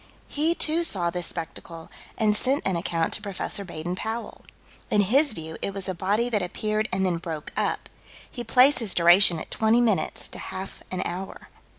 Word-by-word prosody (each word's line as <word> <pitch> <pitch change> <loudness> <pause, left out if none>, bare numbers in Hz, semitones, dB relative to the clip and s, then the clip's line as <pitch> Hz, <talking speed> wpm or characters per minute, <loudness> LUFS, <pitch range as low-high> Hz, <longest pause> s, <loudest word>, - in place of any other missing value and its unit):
He, 315 +3 +1
too, 320 +1 +1
saw 180 - +1
this 175 -1 -3
spectacle, 165 0 -7 0.3
and 215 -2 +3
sent 265 +6 +1
an 190 - +1
account 165 -1 -1
to - - +1
Prof. 200 -3 -6 0.3
Baden 170 +1 -4
Powell. 225 +4 -5 0.5
In 210 - +4
his 260 +7 +3
view 160 -4 -7
it 200 - -3
was 195 -1 0
a 185 - -1
body 205 +7 0
that 220 -4 0
appeared 215 +4 -2
and 190 +1 0
then 180 -2 +1
broke 165 -3 -6
up. - - -1 0.4
He 240 - -7
places 250 -2 +4
duration 175 +1 +6
at - - -8
twenty 225 +2 +3
minutes 215 -9 +1
to - - -6
half 190 +1 -7
an 185 0 -2
hour. 185 +2 -6
195 Hz, 185 wpm, -25 LUFS, 175-225 Hz, 0.5 s, duration